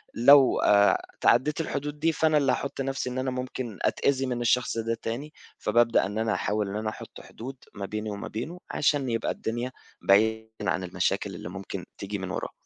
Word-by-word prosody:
لو 135 +3 +7
آآ 100 0 +4 0.2
تعديت 150 +6 +3
الحدود 150 -1 -4
دي 165 +2 +3
فأنا 155 -1 +2
اللي 135 -3 +3
هاحط 135 +1 -2
نفْسي 135 -1 -2
إن 125 - -5
أنا 130 0 -1
ممكن 125 -4 -5
أتأذي 135 -1 +1
من 125 -2 -2
الشخص 120 0 +2
ده 115 0 -1
تاني، 140 +7 -4 0.3
فبابدأ 115 -1 +3
إن 100 +2 -4
أنا 110 -1 +1
أحاول 105 -1 -1
إن 100 - -5
أنا 110 0 -2
أحط - - -10
حدود 130 +4 -9 0.2
ما 100 -1 -4
بيني 105 +2 -4
وما 100 -1 -5
بينه 150 +11 -5
عشان 140 -2 +1
يبقى 115 -1 0
الدنيا 120 +3 -3 0.3
بعيدًا 110 +3 +3 0.2
عن 95 - -1
المشاكل 95 +2 -1
اللي 85 - -7
ممكن 95 0 -6
تيجي 100 +1 -4
من 95 -1 -5
وراه. - - -4
115 Hz, 190 wpm, -27 LUFS, 105-135 Hz, 0.3 s, لو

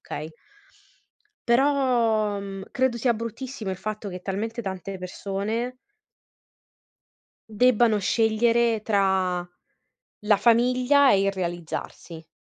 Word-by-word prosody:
okay? 155 +1 -6 1.2
Però, 235 -5 +2
mhmm, 195 -1 -7
credo 260 -2 0
sia 235 0 +1
bruttissimo 230 0 -6
il 190 - -3
fatto 215 +1 -5
che 180 -1 -7
talmente 215 +5 -4
tante 190 -1 -6
persone 200 +7 -4 1.8
debbano 235 -1 +3
scegliere 230 +2 +2
tra 190 -4 +1 0.8
la 210 -1 +3
famiglia 250 +5 +4
e 195 - +3
il 195 0 +1
realizzarsi. 170 -2 -6
215 Hz, 95 wpm, -25 LUFS, 195-235 Hz, 1.8 s, famiglia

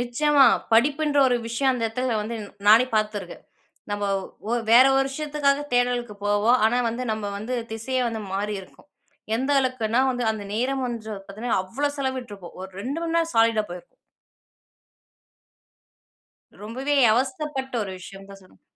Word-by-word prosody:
நிச்சயமா 280 +4 +3 0.3
படிப்புன்ற 290 +5 +3
ஒரு 245 - +2
விஷயம் 250 +4 +1
அந்த 240 -3 -2
இடத்தில 240 +1 -1
வந்து 230 +2 -4 0.3
நானே 225 +4 +7
பார்த்து 215 0 +1
இருக்கேன். - - -10 0.5
நம்ம 205 0 -2 0.5
ஒ 240 - +2 0.2
வேற 250 +3 +8
ஒரு 270 - +3
விஷயத்துக்காக 290 0 0
தேடலுக்கு 245 -2 0
போவோம். 205 +4 +3
ஆனா 245 +3 +1
வந்து 240 +2 -3
நம்ம 210 -2 -4
வந்து 230 +5 -4 0.2
திசையே 255 +4 -2
வந்து 225 -2 -5
மாறியிருக்கும். 200 -1 -5 0.5
எந்த 265 +4 -2
அளவுக்குன்னா 250 -3 0
வந்து 245 -1 -2
அந்த 215 -2 -7
நேரம் 260 +3 -1
வந்து 230 -3 -6 0.2
பார்த்தீங்கன்னா, 215 +1 -2
அவ்ளோ 285 +10 -2
செலவிட்டிருப்போம். 245 -9 -5
ஒரு 190 - -8
2 275 +7 -3
மணி 335 0 -2
நேரம் 330 0 0
சாலீடா 225 -1 +3
போயிருப்போம். 180 - -10 2.7
ரொம்பவே 260 +7 -2 0.2
அவஸ்தப்பட்ட 265 +3 -1
ஒரு 195 - -6
விஷயம் 195 +1 -11
தான் 195 0 -12
சொல்லணும். 185 - -22
240 Hz, 145 wpm, -24 LUFS, 215-265 Hz, 2.7 s, வேற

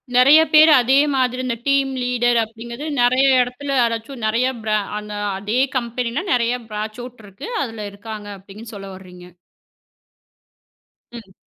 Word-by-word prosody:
நிறைய 275 +5 +7
பேர் 310 +1 +8
அதே 260 +3 +3 0.2
மாதிரி 255 -1 0
இந்த 235 -2 -2
டீம் 275 -1 +2
லீடர் 240 -1 +1
அப்படிங்கறது 235 +5 -9 0.2
நிறைய 255 +3 +3 0.6
இடத்துல 230 +1 -5
நிறைய 230 +4 +1 0.5
பிரான் 210 0 -7 0.2
அதே 210 +5 -2 0.2
கம்பெனில 240 +5 -3
நிறைய 240 0 +1 0.2
பிரான்ச் 215 +2 -5 0.3
இருக்கு. 200 - -10
அதுல 225 -5 -5
இருக்காங்க. 210 0 -9
அப்படினு 215 +4 -12
சொல்ல 195 -1 -9
வரீங்க. 180 -1 -14 1.8
ம். 220 -6 -12
235 Hz, 120 wpm, -20 LUFS, 210-255 Hz, 1.8 s, பேர்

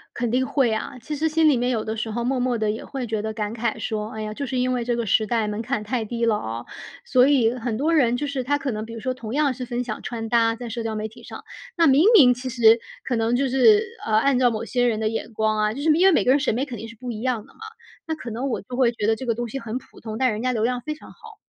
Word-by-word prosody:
肯 240 -1 -1
定 260 +2 +1
会 260 -5 +2
啊。 250 +4 -4
其 300 +6 -5
实 315 +3 +1
心 315 0 +3
里 285 - +4
面 245 +1 0
有 225 -3 -1
的 220 +1 -3
时 220 0 -3
候 235 +2 -3
默 260 +1 0
默 245 -2 0
地 215 -1 0
也 220 - -5
会 270 -3 -5
觉 220 -2 -2
得 220 - -3
感 210 0 -4
慨 230 -1 -2
说： 215 0 -3
“哎 220 - -5
呀， 215 0 -5
就 280 - -4
是 255 +1 -2
因 255 0 +1
为 245 -2 -1
这 240 - 0
个 235 - -2
时 215 +2 +2
代 220 -1 0
门 210 +2 -3
槛 215 - -2
太 225 +2 -2
低 235 +2 -2
了 220 -2 +3
啊。” 115 - -5 0.4
所 255 - +4
以 245 -5 +3
很 240 -2 -3
多 300 +7 +1
人 245 -6 +3
就 290 +4 -2
是 275 -3 -3
他 290 +3 +1
可 275 -2 -3
能 215 +1 -4
比 230 - -10
如 230 - -7
说 255 +2 -2
同 230 -3 -7
样 295 -2 +2
是 250 0 -5
分 245 0 -3
享 215 -3 -5
穿 225 -2 -5
搭， 230 -1 +3
在 235 +1 -7
社 230 +1 -4
交 225 -1 -3
媒 215 0 -3
体 225 - -16
上， - - -10 0.3
那 335 -2 +4
明 275 +4 +5
明 255 - +8
其 255 +1 -6
实 230 -2 +5 0.3
可 250 - -1
能 225 +1 +1
就 270 +1 +1
是， 415 - +5 0.2
呃， 220 - -3
按 270 +2 +3
照 250 -1 +4
某 220 -1 -3
些 245 +1 +1
人 220 -2 0
的 215 - +1
眼 225 +1 -4
光 215 0 0
啊， 210 0 +1
就 270 - -6
是 305 - -1
因 345 +5 +4
为 385 - +6
每 - - +3
个 - - +3
人 275 - +5
审 270 -5 +1
美 255 +4 0
肯 250 -4 -7
定 225 - -7
是 230 - -11
不 250 +2 -6
一 215 -2 -5
样 245 -5 -1
的 - - -20
嘛。 - - -23 0.5
那 320 - -1
可 255 -6 -8
能 245 +5 -3
我 240 - -2
就 250 - -8
会 250 -2 +3
觉 220 -3 -2
得 225 0 +2
这 260 - -7
个 230 - +1
东 240 0 -4
西 270 - -4
很 230 0 -4
普 - - -18
通， 220 -1 -6
但 260 0 +3
人 215 +1 -4
家 255 0 +1
流 220 -3 -1
量 250 +1 0
非 305 +3 -4
常 305 - -15
好。 445 -2 -14
240 Hz, 345 characters per minute, -23 LUFS, 220-260 Hz, 0.5 s, 明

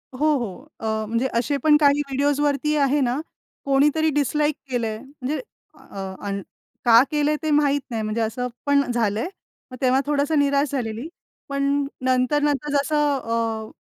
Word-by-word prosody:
हो, 300 +4 +1
हो. 240 +4 -6
अ, 220 -1 -2
म्हणजे 230 +4 0
असे 280 +4 0
पण 300 -1 +6
काही 290 -1 +4
व्हिडिओजवरती 290 +2 +1
आहे 285 +1 +2
ना, 255 +2 0 0.5
कोणीतरी 295 +3 +3
डिसलाइक 295 +1 +1
केलंय 225 -3 -1
म्हणजे 275 +2 -5 0.4
अ, 195 -1 -7
अन 200 0 -2 0.4
का 230 0 +8
केलंय 300 0 +2
ते 310 - 0
माहित 285 -1 +3
नाही 225 - -2
म्हणजे 215 +2 -2
असं 225 +3 -2 0.2
पण 285 -1 +4
झालंय. 225 - 0 0.4
मग 255 - -8
तेव्हा 260 0 +3
थोडसं 290 +1 +1
निराश 280 0 +2
झालेली. 240 -1 -3 0.4
पण 280 0 -1 0.4
नंतर 255 +3 +2
नंतर 295 0 0
जसं 295 0 +1
अ, 225 -2 -2
275 Hz, 150 wpm, -23 LUFS, 230-295 Hz, 0.5 s, का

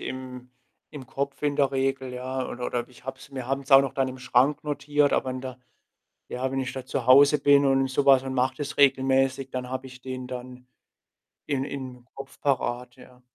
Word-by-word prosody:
im 125 -1 -7 0.4
im 140 -4 -9
Kopf 140 +2 -4
in 145 -1 0
der 140 -1 +2
Regel, 135 -1 -1
ja? 130 +1 -4
Oder 125 0 -6
oder 120 0 -3
ich 125 - -19
habe 135 0 -6
es 135 - -15
wir 130 -2 -5
haben's 135 +1 -3
auch 135 0 +9
noch 135 -1 -3
dann 135 -1 0
im 130 0 -8
Schrank 130 +4 +2
notiert, 145 0 +1
aber 130 - 0
in 130 0 -5
der 130 -1 -7 0.7
ja, 130 +1 -3
wenn 135 - -1
ich 130 -1 -4
da 130 -1 -7
zu 130 -2 -3
Hause 140 +3 +7
bin 140 -1 +4
und 135 0 +2
so 140 +2 -1
was 135 -2 +6
und 130 - -4
mache 130 +1 0
das 145 -1 -5
regelmäßig, 135 -1 +2
dann 125 -1 -4
habe 130 0 -4
ich 130 -1 -13
den 130 -1 -6
dann 125 0 -8 0.8
in 135 -2 -1
im 130 -3 -7
Kopf 135 0 -10
parat, 125 -3 -1
ja. 125 0 -17
130 Hz, 210 wpm, -26 LUFS, 125-135 Hz, 0.8 s, auch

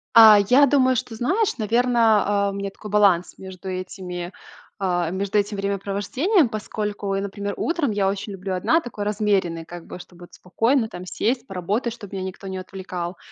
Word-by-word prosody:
А, 220 -2 +10
я 280 +3 +7
думаю, 260 -2 +3
что, 225 -1 -3
знаешь, 370 - 0
наверно, 230 0 +3 0.2
а, - - 0
у - - -7
меня 200 0 -3
такой 210 +1 -11
баланс 200 -4 +3
между 190 0 -10
этими, 185 -1 -5 0.5
а, 175 -4 0
между 200 +3 0
этим 205 0 -2
времяпровождением, 200 - 0
поскольку 210 -2 -3
я, 195 - -1
например, 200 0 -4
утром 330 -6 0
я 200 -2 +1
очень 200 +1 -3
люблю 190 0 -4
одна, 250 - +2
такой 215 -8 -6
размеренной, 200 -6 0
как 175 0 -10
бы, - - -8
чтобы 175 0 -14
вот - - -15
спокойно, 225 +6 +1
там, 180 -3 -9
сесть, 245 +6 -1
поработать, 205 +6 -2
чтоб 205 -5 -11
меня 190 -1 -4
никто 190 +1 -7
не 190 -1 -4
отвлекал. 185 -2 -6
200 Hz, 180 wpm, -23 LUFS, 185-225 Hz, 0.5 s, А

